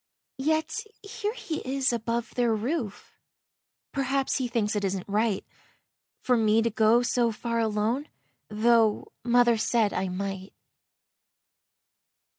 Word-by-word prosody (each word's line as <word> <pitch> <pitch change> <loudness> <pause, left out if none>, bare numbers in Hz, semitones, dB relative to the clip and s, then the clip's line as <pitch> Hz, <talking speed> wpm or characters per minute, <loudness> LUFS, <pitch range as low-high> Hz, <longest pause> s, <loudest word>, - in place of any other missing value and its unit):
Yet 315 +3 0 0.2
here 420 +1 -4
he 320 -9 -4
is 265 -1 0
above 235 0 -2
their 240 -3 +2
roof; 225 -2 -4 0.8
Perhaps 275 0 0
he 255 - -1
thinks 225 -3 -1
it 205 - -1
isn't 190 -1 -2
right 210 0 0 0.8
For 250 - +3
me 220 0 +3
to 230 - 0
go 225 +3 +4
so 240 -1 +1
far 230 +1 -2
alone, 225 +6 0 0.4
Tho' 220 0 +2
mother 240 -1 +4
said 220 -2 +2
I 190 - -1
might. 195 +1 -5
230 Hz, 120 wpm, -27 LUFS, 215-255 Hz, 0.8 s, go